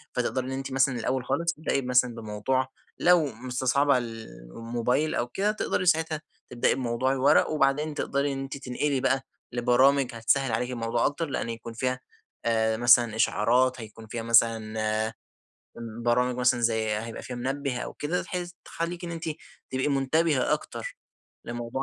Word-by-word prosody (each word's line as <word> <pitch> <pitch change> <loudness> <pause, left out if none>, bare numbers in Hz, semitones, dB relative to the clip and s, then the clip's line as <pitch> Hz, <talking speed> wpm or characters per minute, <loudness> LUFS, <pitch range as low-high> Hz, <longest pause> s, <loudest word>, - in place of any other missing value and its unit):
فتقدري 125 +1 -1
إن - - -4
أنتِ 135 +1 -4
مثلًا 135 0 +2
الأول 125 +2 -1
خالص 165 +6 0
تبدئي 150 -3 -1
مثلًا 125 -2 +2
بموضوع 115 +4 -1 0.3
لو 175 -3 +5
مستصعبة 130 +2 +1
ال 115 -2 -5 0.3
الموبايل 120 +6 0
أو 120 - 0
كده 200 +10 0
تقدري 215 -3 -1
ساعتها 160 -3 +2 0.3
تبدأي 120 -1 +1
بموضوع 130 0 0
الورق 135 0 +4
وبعدين 150 0 +1
تقدري 140 -1 -1
إن 135 - -4
أنتِ 135 +1 -5
تنقلي 135 +1 -1
بقى 135 +1 +1 0.3
لبرامج 125 +2 +3
هتسهل 120 +3 +1
عليكِ 125 +3 -1
الموضوع 115 -1 0
أكتر، 155 +3 0
لأن 115 - -2
يكون 115 0 -6
فيها 125 +2 -1 0.5
آآ، 110 -1 +2
مثلًا 120 -1 +5
إشعارات 120 +3 +2
هيكون 110 0 -11
فيها 115 +1 -5
مثلًا 110 -2 +2 1.1
برامج 125 +1 +2
مثلًا 125 -1 +2
زي 110 -2 +1
هيبقى 115 +1 -6
فيها 125 - -6
منبه 135 +1 -2
أو - - -5
كده 165 +5 -2
بحيث 180 -1 -5
تخليكِ 170 +1 -4
إن 170 - -5
أنتِ 165 -1 -5 0.5
تبقي 130 +2 0
منتبهة 140 +1 +2
أكتر - - -4 0.5
لموضوع 120 +2 -4
125 Hz, 155 wpm, -27 LUFS, 115-140 Hz, 1.1 s, لو